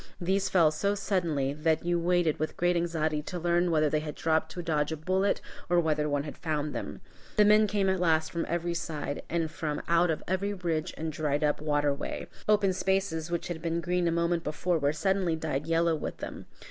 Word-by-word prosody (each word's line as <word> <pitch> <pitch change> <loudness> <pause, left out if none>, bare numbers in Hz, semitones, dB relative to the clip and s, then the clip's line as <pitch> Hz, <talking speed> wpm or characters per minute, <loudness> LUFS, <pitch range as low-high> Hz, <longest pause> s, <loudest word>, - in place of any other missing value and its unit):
These 190 +2 +1
fell 165 -5 +5
so 200 +7 0
suddenly, 170 -9 0
that 160 +2 0
you 175 0 +1
waited 175 -2 +2
with 155 - -3
great 175 0 +2
anxiety 160 -3 0
to 180 +4 -6
learn 175 +1 +2
whether 155 -2 +3
they 155 +1 +1
had 150 -1 -6
dropped 160 0 0
to 175 - -5
dodge 150 -2 0
a 160 - -2
bullet 190 +5 +1 0.3
or 175 0 +4
whether 150 -2 +1
one 145 -1 0
had 150 - -8
found 150 -2 -2
them. - - -5 0.3
The 210 - +6
men 210 +1 +6
came 200 -1 +1
at 190 -1 +1
last 160 -2 +2
from 170 - -2
every 170 0 -1
side, 150 -4 -4
and 165 -2 -1
from 155 -2 -3
out 170 +1 +3
of 160 - -1
every 200 +2 -1
ridge 170 -4 -2
and 160 0 -3
dried 150 0 0
up 150 0 +1
waterway. 145 -2 -1 0.2
Open 205 -3 +4
spaces 190 -4 0
which 170 -1 -2
had 170 -2 -5
been 165 0 -1
green 175 +1 0
a - - +2
moment 170 0 +1
before 165 +3 0
were 145 -1 +2
suddenly 185 +1 +1
dyed 155 -2 -3
yellow 165 0 +2
with 150 - -5
them. - - -7
165 Hz, 210 wpm, -29 LUFS, 155-180 Hz, 0.3 s, The